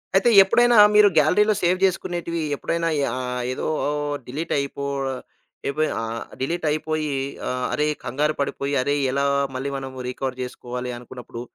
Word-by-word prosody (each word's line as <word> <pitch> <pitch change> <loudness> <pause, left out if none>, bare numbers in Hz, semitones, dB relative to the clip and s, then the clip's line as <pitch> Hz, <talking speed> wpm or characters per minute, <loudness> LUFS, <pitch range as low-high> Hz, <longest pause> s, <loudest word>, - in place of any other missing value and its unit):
అయితే, 195 +5 +5
ఎప్పుడైనా 240 +4 +4 0.2
మీరు 210 0 +8
గ్యాలరీలో 210 +8 +4
సేవ్ 180 +1 +3
చేసుకునేటివి 175 -2 -2
ఎప్పుడైనా 165 +3 -1 0.3
ఆహ్, 125 -1 -3
ఏదో - - -3 0.6
డిలీటయిపో 140 0 -2 0.8
ఏపోయా 155 +3 0
ఆహ్, 115 0 -4 0.2
డిలీటయిపోయి 155 0 -1 0.4
ఆహ్, 125 0 -2
అరే! 150 0 +1 0.2
కంగారు 150 +4 0
పడిపోయి, 140 0 -2
అరే! 145 +3 0 0.2
ఎలా 140 +1 0 0.3
మళ్ళీ 135 +2 -2
మనం 135 -1 -6 0.2
రికవర్ 130 0 -4
చేసుకోవాలి 125 0 -6
అనుకున్నప్పుడు, 120 -1 -9
145 Hz, 125 wpm, -23 LUFS, 130-170 Hz, 0.8 s, మీరు